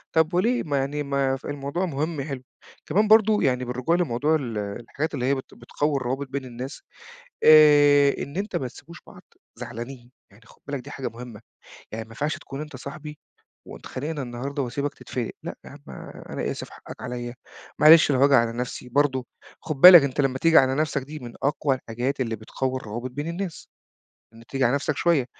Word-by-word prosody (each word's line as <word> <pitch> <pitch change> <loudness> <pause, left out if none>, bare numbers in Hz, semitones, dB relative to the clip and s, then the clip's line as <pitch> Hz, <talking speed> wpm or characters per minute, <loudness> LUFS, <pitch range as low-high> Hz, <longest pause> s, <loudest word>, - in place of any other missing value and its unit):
طب 160 +1 +3
وليه؟ 230 +8 +1
ما 145 -3 -1
يعني 145 +2 -2
ما 140 -1 0
ف - - -16
الموضوع 145 +5 -3
مهم 155 0 -3
يحلّه. 135 -2 -5 0.4
كمان 205 +7 +2
برضه 215 0 +5
يعني 125 -1 +1
بالرجوع 125 +7 0
لموضوع 155 -2 +1
ال 120 -7 -3
الحاجات 115 +9 -4
اللي 125 -3 -2
هي 140 +1 +2
بت 130 - -8
بتقوّي 145 -1 -2
الروابط 135 +2 -3
بين 135 0 -5
الناس، 125 +2 -7 0.6
آآ 145 -2 +7
إن 140 +5 -8
أنت 200 +1 -3
ما 130 - -1
تسيبوش 170 +7 -13
بعض 180 - -14 0.4
زعلانين. 120 +1 -8 0.2
يعني 100 +4 -20
خُد - - -21
بالك 140 -1 -3
دي 145 +3 -11
حاجة 135 - -5
مهمة. 115 -2 -10 0.5
يعني 110 +1 -5
ما 110 - -21
ينفعش 150 +8 -2
تكون 135 +2 -8
أنت 150 -3 -7
صاحبي 150 +3 -9 0.5
واتخانقنا 145 +2 -6
النهارده 135 +4 -4
وأسيبك 140 +3 -3
تتفِلِق، 120 -3 -5
لأ - - -6
يا - - -11
عم - - -14 0.5
أنا - - -3
آسف - - -6
حقّك - - -12
عليّا، 120 -1 -5 0.4
معلش 155 0 +7
لو 130 - +1
هاجي 140 0 +5
على 115 -3 +4
نفسي 125 +1 -5
برضه، 130 -1 +1 0.4
خُد 155 - -4
بالك 180 -4 +11
أنت 140 +1 -1
لمّا 130 -2 0
تيجي 165 +1 +5
على 130 0 +3
نفسك 145 -2 -1
دي 150 +3 -8
من 120 -4 -9
أقوى 145 0 +1
الحاجات 125 +3 -4
اللي 115 -3 -1
بتقوّي 130 +4 -3
الروابط 120 +1 -6
بين 145 +5 -5
الناس، 175 +1 -5 0.7
إنه 115 - -15
تيجي 135 -1 0
على 120 - +2
نفسك 145 0 -2
شوية. 165 -7 +2
140 Hz, 190 wpm, -24 LUFS, 125-150 Hz, 0.7 s, بالك